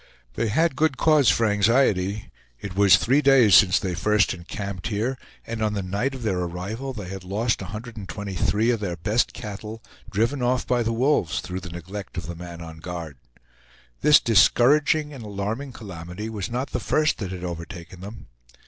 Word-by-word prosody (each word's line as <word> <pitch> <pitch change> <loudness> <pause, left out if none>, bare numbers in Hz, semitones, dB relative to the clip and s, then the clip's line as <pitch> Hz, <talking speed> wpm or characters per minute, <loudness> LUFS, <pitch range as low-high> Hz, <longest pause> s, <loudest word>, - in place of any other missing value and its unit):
They 115 - -1
had 160 +7 +1
good 150 -2 +1
cause 150 -6 +4
for 115 - +3
anxiety; 105 -2 +2 0.3
it 95 +5 -7
was 100 -1 +6
three 135 +5 +2
days 135 -7 +5
since 90 -3 +7
they 95 -2 -2
first 105 +4 +2
encamped 95 +2 -6
here, 115 +4 -1 0.3
and 115 -1 -5
on 105 -1 +1
the 100 - -2
night 105 +9 -2
of 130 - -8
their 95 -5 0
arrival 95 +10 -4
they 105 -7 -7
had 95 0 -7
lost 105 +6 -1
123 105 0 -2
of 115 - -1
their 95 -4 -3
best 105 +8 +1
cattle, 110 -1 -7 0.3
driven 115 +7 0
off 125 +1 +1
by 125 -1 +1
the 115 0 0
wolves, 115 - +1
through 90 0 -5
the 90 -1 -9
neglect 90 +4 -8
of 90 - -4
the 85 - -5
man 85 0 -9
on 80 -1 -9
guard. 85 -4 -7 0.8
This 150 0 +7
discouraging 145 +7 +4
and 130 -4 -9
alarming 105 +6 -4
calamity 95 -1 -7
was 100 -4 -4
not 125 +3 -3
the - - -1
first 155 -1 +1
that 95 -4 -4
had 90 -1 -6
overtaken 85 +1 -7
them. 105 +4 -9
105 Hz, 180 wpm, -24 LUFS, 90-120 Hz, 0.8 s, since